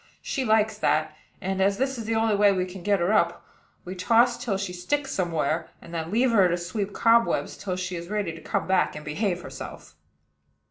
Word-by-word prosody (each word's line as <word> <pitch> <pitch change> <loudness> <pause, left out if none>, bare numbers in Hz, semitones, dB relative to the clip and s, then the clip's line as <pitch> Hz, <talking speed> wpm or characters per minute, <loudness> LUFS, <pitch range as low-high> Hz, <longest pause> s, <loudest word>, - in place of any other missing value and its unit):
She 270 - -2
likes 220 -2 +2
that; 155 -1 +1 0.3
and, 190 0 -2
as 195 +1 +2
this 265 +2 0
is 225 - -5
the 225 +1 -1
only 220 -1 +2
way 205 0 +5
we 185 -2 0
can 185 0 -9
get 200 +1 +2
her 175 +5 +1
up, 170 -5 +1 0.4
we 180 - -5
toss 235 +6 +3
till 200 -5 -1
she 195 -2 -4
sticks 270 +11 -2
somewhere, 165 - -1
and 170 - -13
then 165 -1 -3
leave 240 +5 +2
her 195 -5 +5
to 175 - +1
sweep 195 +4 -3
cobwebs 230 +2 +2
till 190 -3 -4
she 180 0 -4
is 170 +1 -7
ready 205 -5 -2
to 165 - -11
come - - -2
back 190 -4 +1
and 150 - -8
behave 175 +3 -1
herself." - - -9
195 Hz, 215 wpm, -26 LUFS, 175-220 Hz, 0.4 s, way